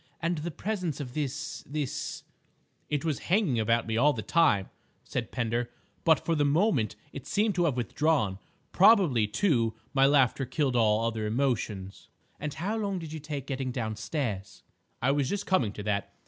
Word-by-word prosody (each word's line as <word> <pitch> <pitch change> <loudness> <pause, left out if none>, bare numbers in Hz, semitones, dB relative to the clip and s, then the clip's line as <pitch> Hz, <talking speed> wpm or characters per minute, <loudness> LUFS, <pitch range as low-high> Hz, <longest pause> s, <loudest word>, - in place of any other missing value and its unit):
"And 170 -2 -1
the 165 +3 -3
presence 180 -3 -3
of 130 -4 -6
this—this—?" 150 0 -4 0.7
"It 150 +1 -1
was 155 -5 0
hanging 180 - +3
about 115 +1 +2
me 110 0 -1
all 145 +5 +5
the 110 -5 -5
time," 110 - +3 0.3
said - - -4
Pender, 120 0 -1 0.3
"but 160 -1 +5
for 165 - +1
the 150 -2 +2
moment 145 - +2 0.2
it 140 0 -8
seemed 210 +1 +1
to 175 -2 +1
have 140 -6 0
withdrawn. 125 -4 +1 0.3
Probably, 180 - +5
too, 115 - +1 0.2
my 135 0 +5
laughter 135 -2 +3
killed 135 -1 0
all 110 -1 +3
other 110 -2 -1
emotions." 110 -5 -2 0.3
"And 150 0 -3
how 195 +8 -2
long 200 -3 -1
did 160 -3 -7
you 160 - -5
take 145 -3 -5
getting 130 -2 -3
downstairs?" 110 -2 -4 0.4
"I 135 - +4
was 140 -1 +1
just 205 0 -2
coming 130 - +2
to 105 - -7
that. 100 -1 -1
140 Hz, 170 wpm, -28 LUFS, 115-160 Hz, 0.7 s, all